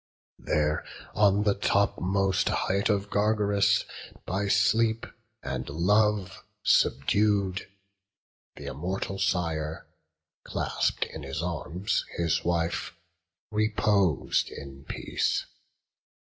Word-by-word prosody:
There 75 0 0 0.3
on 105 0 +4
the 105 -1 +3
topmost 100 -1 +1
height 100 +3 0
of 100 -1 0
Gargarus, 105 -1 +2 0.4
By 100 +2 -1
sleep 110 +3 +2 0.4
and 65 +2 -4
love 100 +5 +1 0.2
subdued, 100 +5 +2 0.9
th' - - -10
immortal 95 +6 -4
Sire, 85 -5 -1 0.6
Clasp'd - - -1
in 80 - -7
his 70 +3 -4
arms 90 +2 -2
his 85 0 +1
wife, 85 0 -1 0.6
repos'd 105 -6 +2
in 70 0 -10
peace. - - -1
95 Hz, 90 wpm, -28 LUFS, 85-105 Hz, 0.9 s, on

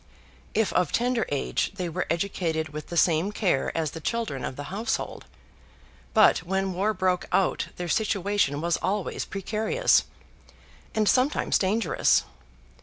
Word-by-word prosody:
If 220 -1 +1
of 180 -4 +2
tender 245 -1 +1
age 145 +6 -1
they 180 -3 -3
were 165 - -3
educated 165 -2 -1
with 150 +1 -7
the 170 - -5
same 165 +4 +3
care 185 -10 0
as 160 -3 0
the 160 - -7
children 220 - -2
of - - -4
the 145 - -6
household. 220 +3 -3 0.9
But 215 - +6
when 190 +2 -1
war 195 +4 +1
broke 185 -1 0
out 195 - +1
their 175 - -4
situation 200 -6 +1
was 170 0 +1
always 200 0 -2
precarious, 220 - +1 0.9
and 215 -1 +2
sometimes 260 +6 +2
dangerous. 205 +4 +2
190 Hz, 140 wpm, -26 LUFS, 165-215 Hz, 0.9 s, But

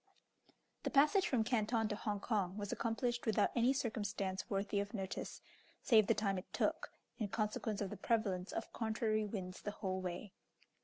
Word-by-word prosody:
The - - -1
passage 305 +8 +5
from 240 -4 +2
Canton 225 -1 +1
to 210 - -1
Hong 205 -1 -2
Kong 195 -3 0
was 205 -1 -3
accomplished 240 +1 -1
without 210 -1 +3
any 240 +1 +4
circumstance 205 -7 -2
worthy 200 0 0
of 200 +2 -3
notice, 190 -2 -4 0.4
save 220 -5 +6
the - - +4
time 195 -3 +1
it 185 - -13
took, - - 0 0.3
in 215 - 0
consequence 215 0 -1
of 195 - -2
the - - -5
prevalence 200 -5 0
of 225 - -4
contrary 220 -1 0
winds 185 -3 -5
the - - -3
whole 190 -2 -2
way. 185 +2 -5
210 Hz, 170 wpm, -37 LUFS, 195-225 Hz, 0.4 s, save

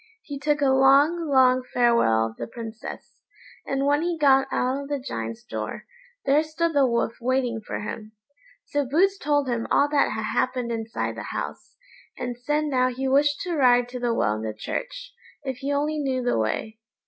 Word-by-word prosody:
He 285 -2 -7
took 295 +1 0
a 275 -2 +4
long, 280 +6 +4
long 255 -2 +5
farewell 235 - +2
of 110 0 -6
the - - -5
Princess, 225 -1 -9 0.5
and 275 0 0
when 290 +1 +3
he 345 0 -1
got 270 -3 +4
out 260 +2 0
of 280 - -8
the 290 - 0
Giant's 115 - -5
door, 110 -1 -6 0.4
there 280 +2 +4
stood 320 +1 -1
the 280 -2 +4
Wolf 235 -1 -1
waiting 245 -2 0
for - - -5
him. 215 +1 -7 0.5
So 290 0 -1
Boots 370 +9 +2
told 290 -2 +1
him 235 -2 -2
all 285 - +4
that 285 -6 +2
had 220 0 -3
happened 235 +3 -1
inside 225 -1 -3
the - - -6
house, - - -6 0.4
and 245 - -4
said 295 +5 -1
now 255 -3 +2
he 255 +1 -3
wished 285 +2 +2
to 355 -3 -2
ride 245 -4 +4
to 250 0 -6
the 240 -1 0
well 105 - +1
in 110 - -4
the 110 -1 -4
church, - - -5 0.3
if 265 -2 -4
he 280 +2 -3
only 300 +2 0
knew 260 -3 -1
the 245 - +1
way. 215 - -2
265 Hz, 195 wpm, -25 LUFS, 235-290 Hz, 0.5 s, long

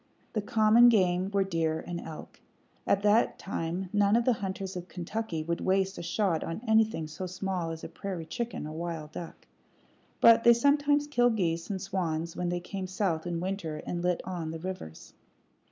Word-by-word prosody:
The 215 - 0
common 220 +3 +6
game 185 -4 +2
were 200 -1 +2
deer 165 -4 -1
and 175 -1 -4
elk. 160 -1 -10 0.5
At 200 - +2
that 210 +2 +3
time 180 0 -3
none 205 0 +4
of 235 0 +2
the 255 - +4
hunters 195 -2 -4
of 180 0 -6
Kentucky 180 -2 -4
would 170 +1 -2
waste 190 +1 +1
a - - -4
shot 170 -1 0
on 165 - -4
anything 220 -6 +3
so 160 +4 -6
small 185 -2 -3
as 165 0 -6
a - - -4
prairie 175 0 -6
chicken 235 -1 -4
or 155 - -6
wild 160 -2 -5
duck; 170 +1 -8 0.7
but 230 0 +7
they 235 - +8
sometimes 290 +4 +3
killed 245 -5 +2
geese 165 -3 -1
and 195 -2 -2
swans 170 -4 -2
when 175 -1 -2
they 175 0 -1
came 190 +1 -5
south 180 -3 -1
in 170 -1 -2
winter 180 -5 -4
and 175 - -3
lit 180 0 0
on 175 -4 -4
the 165 - -4
rivers. 175 - -7
185 Hz, 185 wpm, -29 LUFS, 165-210 Hz, 0.7 s, they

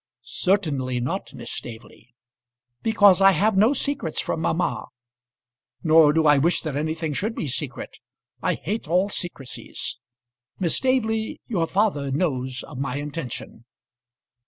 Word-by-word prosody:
"Certainly 140 -4 0
not, 155 +11 -3
Miss - - -6
Staveley." 115 +1 -9 0.7
"Because 205 -4 +5
I 195 0 +7
have 205 +5 +2
no 215 +6 +5
secrets 280 - -2
from 160 - -2
mamma." 160 -9 -1 1.0
"Nor 160 -2 +6
do 160 +1 +2
I 145 -2 +6
wish 170 +5 +2
that 155 -4 -3
anything 155 +1 -2
should 215 +10 -2
be 155 - -3
secret. 135 0 -3 0.4
I - - +1
hate 210 +3 -4
all 180 +5 +2
secrecies. 160 -10 -4 0.6
Miss 175 -4 +1
Staveley, 225 -4 0
your 175 -9 -1
father 185 -9 +1
knows 130 -4 -1
of 145 -5 -9
my 135 -1 -2
intention." 145 -5 -6
160 Hz, 135 wpm, -24 LUFS, 140-195 Hz, 1.0 s, I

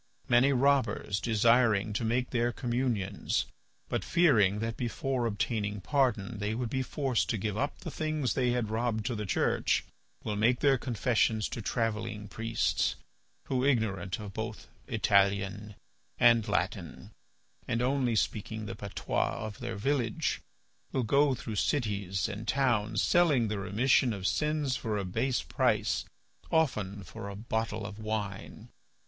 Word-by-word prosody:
Many 125 +3 +5
robbers 130 -6 +2
desiring 110 -2 +3
to 105 - -1
make 120 +3 0
their 120 -1 +1
communions, 120 -6 -1 0.4
but - - -2
fearing 115 - +4
that 115 +1 -2
before 125 0 -1
obtaining 105 -1 -1
pardon 115 -1 0
they 105 +1 -1
would 120 -1 -3
be 130 - 0
forced 130 - -1
to 115 - 0
give 105 0 -2
up 140 +6 -2
the 165 - -6
things 155 -5 -1
they 125 -2 +1
had 120 -3 -1
robbed 110 -1 -1
to 125 - -1
the 105 -2 -4
Church, - - +1 0.4
will 105 - -2
make 115 +4 +3
their 135 -3 +4
confessions 115 -3 +1
to 115 - -5
travelling 110 -1 -2
priests, 115 +2 0 0.5
who, 130 -1 -1
ignorant 105 -8 0
of 105 -2 -7
both 110 0 -5 0.2
Italian 100 -1 +1 0.4
and 115 -3 +5
Latin, - - -2 0.6
and 115 +2 0
only 130 -2 +1
speaking 110 +3 -1
the 115 - -5
patois 100 -2 -2
of 110 +3 -7
their 120 -3 -4
village, 120 +1 0 0.5
will 130 - 0
go 140 +4 +3
through 110 -3 -6
cities 100 -8 0
and 105 +3 -6
towns 115 -5 +1
selling 150 - +3
the 105 -1 -2
remission 115 +5 +2
of 95 -2 -6
sins 150 +5 +1
for 110 -4 -2
a 100 - -2
base 120 +7 0
price, - - +1 0.5
often 105 -11 0
for 100 +3 -8
a 100 - -7
bottle 110 0 -2
of 105 0 -7
wine. 105 -2 -4
115 Hz, 145 wpm, -30 LUFS, 105-125 Hz, 0.6 s, Many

